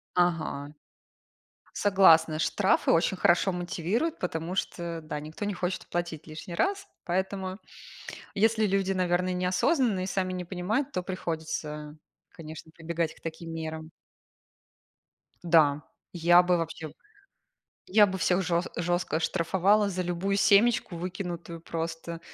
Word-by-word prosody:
Ага. 165 Hz, -5 st, 0 dB, 1.0 s
Согласна! 165 Hz, -6 st, +5 dB
Штрафы 195 Hz, +3 st, +2 dB
очень 170 Hz, +3 st, +2 dB
хорошо 175 Hz, +2 st, +3 dB
мотивируют, 180 Hz, -, -2 dB
потому 175 Hz, 0 st, -3 dB
что, 170 Hz, -3 st, -3 dB
да, 150 Hz, -1 st, -5 dB
никто 155 Hz, +7 st, -6 dB
не 205 Hz, -, -1 dB
хочет 180 Hz, +1 st, -3 dB
оплатить 175 Hz, -3 st, -4 dB
лишний 155 Hz, +3 st, -8 dB
раз. 395 Hz, -, 0 dB, 0.2 s
Поэтому, 190 Hz, +2 st, -2 dB, 0.8 s
если 220 Hz, +1 st, +3 dB
люди, 195 Hz, -1 st, +1 dB
наверное, 180 Hz, 0 st, +1 dB
неосознанные 185 Hz, -, +1 dB
и -, -, -3 dB
сами 185 Hz, -1 st, -1 dB
не 180 Hz, -1 st, -3 dB
понимают, 210 Hz, +11 st, -2 dB
то 180 Hz, -, -2 dB
приходится, 160 Hz, -4 st, -5 dB, 0.3 s
конечно, 160 Hz, 0 st, -10 dB
прибегать 165 Hz, -1 st, -2 dB
к -, -, -21 dB
таким 165 Hz, 0 st, -6 dB
мерам. 160 Hz, 0 st, -5 dB, 1.5 s
Да, 155 Hz, -3 st, +4 dB, 0.3 s
я 175 Hz, +1 st, +5 dB
бы 180 Hz, 0 st, +2 dB
вообще, 160 Hz, -2 st, -5 dB, 0.9 s
я 210 Hz, +2 st, +6 dB
бы 190 Hz, -1 st, -3 dB
всех 185 Hz, +1 st, +2 dB
же 170 Hz, -1 st, +1 dB
жестко 175 Hz, -2 st, 0 dB
штрафовала 190 Hz, +5 st, +2 dB
за 185 Hz, -1 st, -2 dB
любую 180 Hz, +3 st, -1 dB
семечку 205 Hz, -2 st, +4 dB
выкинутую, 170 Hz, -2 st, -5 dB
просто. 165 Hz, 0 st, -5 dB
175 Hz, 125 wpm, -28 LUFS, 165-190 Hz, 1.5 s, я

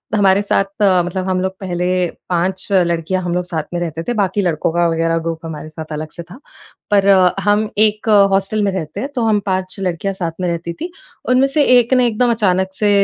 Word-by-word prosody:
हमारे 200 Hz, -1 st, +4 dB
साथ। 200 Hz, -1 st, +1 dB, 0.2 s
मतलब 185 Hz, -1 st, +1 dB
हम 185 Hz, -1 st, 0 dB
लोग 190 Hz, 0 st, -1 dB
पहले 180 Hz, -2 st, -3 dB, 0.4 s
5 185 Hz, +2 st, 0 dB
लड़कियाँ 175 Hz, -1 st, +1 dB
हम 175 Hz, -1 st, -2 dB
लोग 180 Hz, -, 0 dB
साथ 160 Hz, -3 st, -3 dB
में 175 Hz, -, -1 dB
रहते 165 Hz, -1 st, -4 dB
थे 245 Hz, -, -2 dB
बाकी 205 Hz, -1 st, 0 dB
लड़कों 165 Hz, -4 st, 0 dB
का 175 Hz, 0 st, +2 dB
वग़ैरह 165 Hz, 0 st, 0 dB
ग्रुप 165 Hz, 0 st, -4 dB
हमारे 155 Hz, -1 st, -7 dB
साथ 155 Hz, 0 st, -9 dB
अलग 155 Hz, +1 st, -5 dB
से 170 Hz, -, -8 dB
था। 180 Hz, +9 st, -14 dB, 0.5 s
पर 200 Hz, -1 st, +3 dB, 0.4 s
हम 210 Hz, +1 st, +2 dB
एक 215 Hz, +1 st, +2 dB, 0.2 s
हॉस्टल 195 Hz, +2 st, +1 dB
में 200 Hz, -, +1 dB
रहते 160 Hz, -5 st, -5 dB
हैं 275 Hz, -, -3 dB
तो 245 Hz, -, 0 dB
हम 215 Hz, -2 st, +2 dB
5 185 Hz, -1 st, -1 dB
लड़कियाँ 185 Hz, +1 st, -2 dB
साथ 170 Hz, -3 st, -3 dB
में 180 Hz, -, 0 dB
रहती 170 Hz, 0 st, -4 dB
थीं। 340 Hz, -, -3 dB, 0.4 s
उनमें 255 Hz, +2 st, +4 dB
से 290 Hz, +2 st, +2 dB
एक 245 Hz, +1 st, +2 dB
ने 250 Hz, -1 st, +4 dB
एकदम 240 Hz, +2 st, +1 dB
अचानक 190 Hz, -4 st, +1 dB
से 205 Hz, +2 st, 0 dB
185 Hz, 210 wpm, -17 LUFS, 170-205 Hz, 0.5 s, हमारे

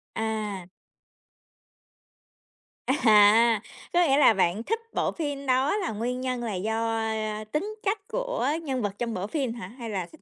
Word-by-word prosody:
À. 215 Hz, -4 st, -3 dB, 2.2 s
À, 220 Hz, -3 st, +5 dB, 0.3 s
có 350 Hz, -, +4 dB
nghĩa 270 Hz, +1 st, +4 dB
là 265 Hz, -, +6 dB
bạn 190 Hz, +2 st, +1 dB
thích 450 Hz, -, -1 dB
bộ -, -, 0 dB
phim 285 Hz, -4 st, -4 dB
đó 265 Hz, +6 st, +2 dB
là 375 Hz, -5 st, -2 dB
nguyên 245 Hz, +4 st, -3 dB
nhân 255 Hz, -2 st, -2 dB
là 220 Hz, -3 st, -3 dB
do, 220 Hz, +4 st, -1 dB
a, 225 Hz, -, -1 dB, 0.4 s
a, 215 Hz, -, -6 dB
tính 410 Hz, +8 st, -2 dB
cách 410 Hz, +2 st, -1 dB
của -, -, -2 dB, 0.2 s
nhân 265 Hz, -5 st, -2 dB
vật 205 Hz, -, -1 dB
trong 235 Hz, -1 st, -2 dB
bộ 190 Hz, 0 st, -3 dB
phim 260 Hz, -2 st, -2 dB
hả? 235 Hz, -6 st, -7 dB
Hay 235 Hz, +1 st, -8 dB
là 190 Hz, -4 st, -2 dB
thích 315 Hz, -, -17 dB
235 Hz, 170 wpm, -26 LUFS, 215-285 Hz, 2.2 s, là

